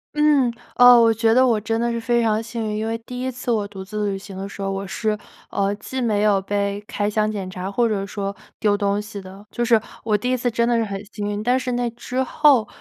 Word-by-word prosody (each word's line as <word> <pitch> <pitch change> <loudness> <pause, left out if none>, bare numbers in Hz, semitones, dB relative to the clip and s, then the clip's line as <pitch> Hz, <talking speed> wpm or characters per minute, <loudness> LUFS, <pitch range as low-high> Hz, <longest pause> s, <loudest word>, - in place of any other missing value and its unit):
嗯， 295 -5 +4 0.2
呃， 245 -1 +8
我 230 -1 +5
觉 225 +1 +2
得 260 +1 +6
我 230 -4 +2
真 225 +1 -1
的 235 0 0
是 235 - -2
非 240 +1 +2
常 220 -1 +1
幸 230 0 -5
运， 210 0 -2
因 220 +1 -2
为 225 0 -1
第 250 +1 -6
1 260 - -1
次 250 0 -4
我 210 -3 0
独 195 -2 -8
自 210 +1 -2
旅 195 - -2
行 195 0 -10
的 195 +1 -5
时 200 - -12
候， 195 0 -2
我 195 0 -3
是， 215 +2 -1 0.4
呃， 200 0 0
既 255 +5 -5
没 210 -4 +1
有 205 -2 +3
被 200 +1 -2
开 205 - -1
箱 215 0 +1
检 200 -3 -4
查 185 +1 -5
或 235 +3 +2
者 205 -3 -1
说 200 -1 -4 0.2
丢 205 -1 +2
东 200 0 0
西 210 -1 -7
的。 190 +2 -12
就 240 - -2
是， 230 -1 +4 0.2
我 215 -2 +2
第 245 +5 -2
1 - - +3
次 245 0 0
真 235 0 +1
的 240 - +2
是 230 - +2
很 200 -2 -4
幸 205 -1 -3
运， 205 0 -3
但 250 +3 +2
是 250 -1 -3
那 245 0 0
之 250 +2 -3
后 270 -5 +4
215 Hz, 275 characters per minute, -22 LUFS, 200-240 Hz, 0.4 s, 呃